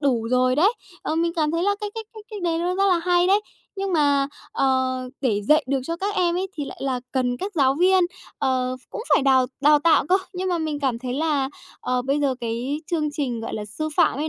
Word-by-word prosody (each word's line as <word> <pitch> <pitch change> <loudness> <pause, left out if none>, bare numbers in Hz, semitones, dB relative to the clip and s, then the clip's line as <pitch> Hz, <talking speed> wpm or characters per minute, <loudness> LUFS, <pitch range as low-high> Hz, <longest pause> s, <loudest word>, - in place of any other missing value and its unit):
đủ 245 -6 +1
rồi 255 +1 +3
đấy. 390 +9 +4 0.3
Ờ, - - -2
mình 335 0 +1
cảm 305 -2 +1
thấy 335 +2 -1
là 405 +1 +2
cái 420 - -3
cách 445 -1 -6
cách 435 -1 -11
cách 415 -4 -6
đấy 330 -1 0
nó 355 +2 0
rất 390 +1 +2
là 360 -2 +3
hay 350 +1 +2
đấy. 395 +3 +4 0.4
Nhưng 390 -1 -2
mà, 285 -3 +3 0.3
ờ, 260 -1 +1 0.2
để 210 -6 0
dạy 305 +7 +4
được 275 -1 +1
cho 335 +2 -3
các 400 +3 -2
em 345 -3 +2
ấy, 380 +1 -1
thì 290 - -2
lại - - -9
là 260 -2 -1
cần 250 -2 0
các 395 +9 -5
giáo 270 -3 +3
viên, 365 +2 +4 0.3
ờ, 255 -1 0
cũng - - -5
phải 275 - +3
đào 260 -2 +4 0.2
đào 295 +1 +6
tạo 305 -1 +3
cơ. 370 - +4 0.2
Nhưng 370 +1 -3
mà 350 -2 0
mình 310 -2 -2
cảm 255 -4 0
thấy 250 0 -4
là, 285 -2 0 0.3
ờ, 250 0 -1
bây 275 +3 0
giờ 275 -3 +1
cái 240 +6 -3
chương 305 -3 0
trình, 260 -6 -3
gọi 225 - -5
là, 210 - -4
sư 310 +10 -4
phạm 325 -5 +3
ấy 310 - -1
295 Hz, 250 wpm, -23 LUFS, 260-350 Hz, 0.4 s, đào